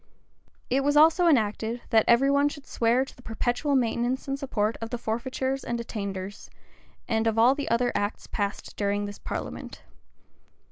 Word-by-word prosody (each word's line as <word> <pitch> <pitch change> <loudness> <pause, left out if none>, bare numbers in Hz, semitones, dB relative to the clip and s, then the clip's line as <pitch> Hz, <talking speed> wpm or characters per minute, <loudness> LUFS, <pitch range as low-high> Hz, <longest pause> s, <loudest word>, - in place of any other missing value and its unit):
[*] - - -42 0.3
It 270 +2 +2
was 290 +1 +2
also 325 +3 +6
enacted, 230 -3 +1
that 220 -2 +5
every 260 +4 +5
one 285 +1 +3
should 290 -1 -10
swear 240 +3 +1
to - - -14
the - - -16
perpetual 245 +5 -1
maintenance 245 +2 0
and 275 0 -2
support 220 -5 -1
of 225 - -4
the 245 - -3
forfeitures 260 +4 -2
and 235 - -2
attainders, 200 -4 -5 0.6
and 225 -1 +1
of 225 0 0
all 235 +4 +6
the 285 0 -4
other 245 +1 +2
acts 205 +1 -2
passed 200 -1 -4
during 205 0 0
this 205 0 -8
parliament. - - -6
235 Hz, 175 wpm, -27 LUFS, 220-270 Hz, 0.6 s, also